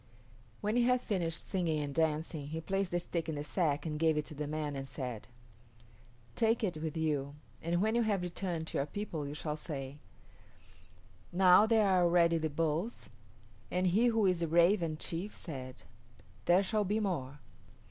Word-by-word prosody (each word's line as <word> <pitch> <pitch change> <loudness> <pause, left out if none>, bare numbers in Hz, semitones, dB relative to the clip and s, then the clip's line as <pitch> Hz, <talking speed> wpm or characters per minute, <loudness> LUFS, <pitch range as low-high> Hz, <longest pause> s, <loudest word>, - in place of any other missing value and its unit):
When 210 +2 0
he - - +5
had 250 +1 +3
finished 175 -8 -2
singing 170 -5 0
and 145 -1 -3
dancing 155 -1 -1
he 160 +2 -4
placed 195 +3 -1
the 175 - 0
stick 170 -1 -3
in 160 - -2
the 145 - -3
sack 150 -2 0
and 150 -1 -3
gave 160 -1 +3
it 150 - 0
to 155 - -9
the 150 0 -4
man 150 -1 -3
and 135 0 -5
said, 125 -6 -6 1.1
"Take 225 0 +2
it 180 -6 -1
with 155 0 -4
you, 145 -3 -1 0.3
and 170 +3 0
when 220 +1 +2
you 235 - +3
have 205 -5 +1
returned 175 -2 -3
to - - -2
your 140 - -1
people 160 -4 -4
you 145 - -6
shall 150 0 -3
say, 145 -2 -6 1.3
'Now 185 +3 +6
there 220 -2 +4
are 185 -2 +4
already 170 -1 +4
the 160 0 -1
Bulls, 165 +8 -2 0.6
and 180 +1 0
he 205 +7 +4
who 225 -3 +3
is 180 -2 +2
the 170 - 0
Raven 170 0 +3
chief 175 +6 -4
said, 130 -5 -8 0.6
"There 180 +6 +5
shall 210 +2 +1
be 205 +3 0
more. 150 -10 -2
165 Hz, 185 wpm, -33 LUFS, 150-195 Hz, 1.3 s, Now